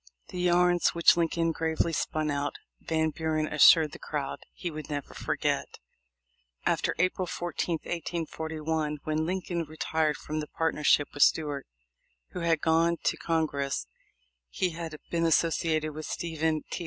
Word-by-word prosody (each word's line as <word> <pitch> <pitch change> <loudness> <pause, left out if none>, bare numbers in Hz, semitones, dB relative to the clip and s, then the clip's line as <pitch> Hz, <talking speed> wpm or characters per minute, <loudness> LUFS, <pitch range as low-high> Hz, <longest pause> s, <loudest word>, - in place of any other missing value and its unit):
The 180 - -6
yarns 175 0 +3
which 170 - +6
Lincoln 165 0 +1
gravely 160 +1 0
spun 155 0 -1
out, 140 0 -2 0.2
Van 160 -1 0
Buren 155 0 -1
assured 155 +1 +6
the - - -10
crowd, 145 -2 -4
he 175 - -5
never 150 -2 -5
would - - -13
forget. - - -1 0.9
After - - +1
April 185 +1 +1
14, 175 0 -2
1841, 160 -2 -3
when 155 +1 -1
Lincoln 180 -1 -2
retired 155 0 -1
from 155 +1 -4
the 150 - -4
partnership 150 -3 +2
with 145 - -4
Stuart, 145 -3 +3 0.6
who - - -6
had 165 -2 +1
gone 165 +1 +3
to - - +2
Con 165 -1 0
gress, 140 -2 -2 0.6
he 185 - -1
had 165 -1 -6
been 170 -1 +2
associated 160 -1 +1
with 155 +1 -6
Stephen 160 -2 -1
T. - - -3
160 Hz, 145 wpm, -28 LUFS, 155-170 Hz, 0.9 s, which